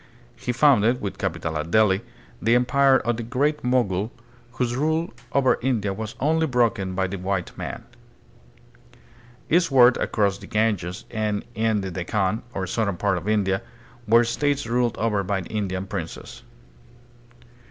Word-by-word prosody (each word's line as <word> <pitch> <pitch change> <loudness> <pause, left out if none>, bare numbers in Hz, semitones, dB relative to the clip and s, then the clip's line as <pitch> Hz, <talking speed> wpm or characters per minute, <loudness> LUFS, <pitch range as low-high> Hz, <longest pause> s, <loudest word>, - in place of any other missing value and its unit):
He 125 - -3
founded, 125 -3 +4
with 100 -3 -5
capital 80 -1 -3
at 75 +2 -4
Delhi, 105 0 +3 0.4
the 115 +3 +3
empire 130 +2 +4
of 120 -2 -1
the - - -3
Great 140 +6 0
Mogul, 115 -5 +1 0.4
whose 120 -1 -1
rule 160 +3 0 0.2
over 135 -2 +3
India 115 -6 0
was 110 +2 -6
only 160 +3 +2
broken 115 -7 +1
by 95 0 +1
the 95 0 -4
white 95 -1 -3
man. - - -6 1.6
Eastward 135 -8 +5
across 100 -2 0
the - - -11
Ganges 105 -5 -1
and 105 -2 -2
in 110 -2 +1
the 95 -1 -4
Dekkan, 95 +4 -1
or 95 - -2
southern 100 0 -1
part 100 -2 +1
of 90 - -10
India, 95 -3 +1 0.5
were 115 +2 +6
states 140 +4 0
ruled 120 0 0
over 105 -3 +1
by 95 0 -1
Indian 95 -2 -3
princes. 95 -4 -7
110 Hz, 145 wpm, -24 LUFS, 95-125 Hz, 1.6 s, were